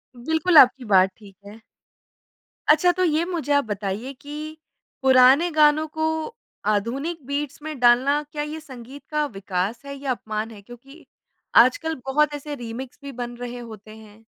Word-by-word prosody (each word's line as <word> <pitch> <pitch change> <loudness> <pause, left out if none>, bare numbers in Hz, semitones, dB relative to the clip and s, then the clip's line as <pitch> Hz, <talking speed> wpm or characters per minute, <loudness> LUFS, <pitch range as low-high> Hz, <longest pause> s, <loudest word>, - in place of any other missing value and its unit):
बिल्कुल 320 +7 +1
आपकी 255 -1 +7
बात 185 0 +6
ठीक 200 -3 -16
है। 210 +2 -12 1.1
अच्छा 315 +4 +5
तो 370 +1 -1
ये 320 -2 +2
मुझे 335 -6 -3
आप 285 0 +3
बताइए 205 +4 -4
कि 305 +2 -8 0.4
पुराने 265 +5 +5
गानों 305 0 +4
को 315 - +1 0.6
आधुनिक 255 +10 -2
बीट्स 285 +1 -4
में 310 -2 -6
डालना, 250 +4 +4
क्या 295 -1 -3
ये 300 +1 -6
संगीत 265 -2 -12
का 300 0 +1
विकास 195 -2 -3
है 280 0 -7
या 275 -1 -3
अपमान 220 -2 -4
है 210 -2 -12
क्योंकि 245 +8 -15 0.5
आजकल 320 +7 +4
बहुत 295 +2 +1
ऐसे 290 0 -6
रीमिक्स 245 0 -8
भी 280 - -7
बन 240 -1 -6
रहे 245 0 -6
होते 215 -2 -11
हैं? 220 0 -17
265 Hz, 160 wpm, -23 LUFS, 230-300 Hz, 1.1 s, आपकी